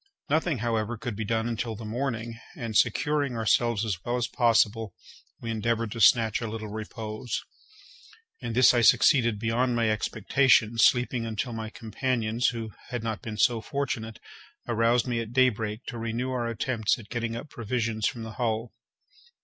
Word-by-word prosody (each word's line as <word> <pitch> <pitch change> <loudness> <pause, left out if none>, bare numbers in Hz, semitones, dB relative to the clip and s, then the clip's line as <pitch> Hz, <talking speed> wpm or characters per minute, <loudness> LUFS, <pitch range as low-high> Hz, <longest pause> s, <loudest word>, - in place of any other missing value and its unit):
Nothing, 155 -1 +2
however, 115 0 -1
could 120 -1 -5
be 110 - -3
done 115 +2 0
until 115 -1 -3
the 110 +1 -8
morning, 115 -1 -3 0.2
and, 115 -8 -5
securing 145 +1 +2
ourselves 115 0 +2
as 95 -5 -3
well 120 +1 -1
as 120 - 0
possible, 115 -3 +2 0.4
we 115 - -4
endeavoured 115 0 -1
to 115 - -4
snatch 115 0 +5
a 115 - -2
little 110 -1 -5
repose. 110 +2 -5 1.0
In 120 -3 -4
this 130 +2 +6
I 120 - +3
succeeded 120 -1 +5
beyond 120 +3 0
my 115 -2 +2
expectations, 115 +1 +2
sleeping 120 -1 +2
until 115 +3 -3
my 110 -1 -5
companions, 115 +1 -1
who 115 -2 -3 0.2
had 120 -3 -4
not 110 -1 -3
been 110 -1 -6
so 115 +1 +3
fortunate, 115 -3 -3 0.5
aroused 115 +1 +2
me 120 -2 -1
at 115 0 -5
daybreak 115 -3 +1
to 120 - -6
renew 115 +3 -2
our 120 -2 -1
attempts 115 -1 0
at 110 -4 -13
getting 115 -1 -3
up 135 +5 -7
provisions 115 -1 -1
from 115 - -4
the 110 - -6
hull. 115 0 -1
115 Hz, 165 wpm, -27 LUFS, 110-120 Hz, 1.0 s, this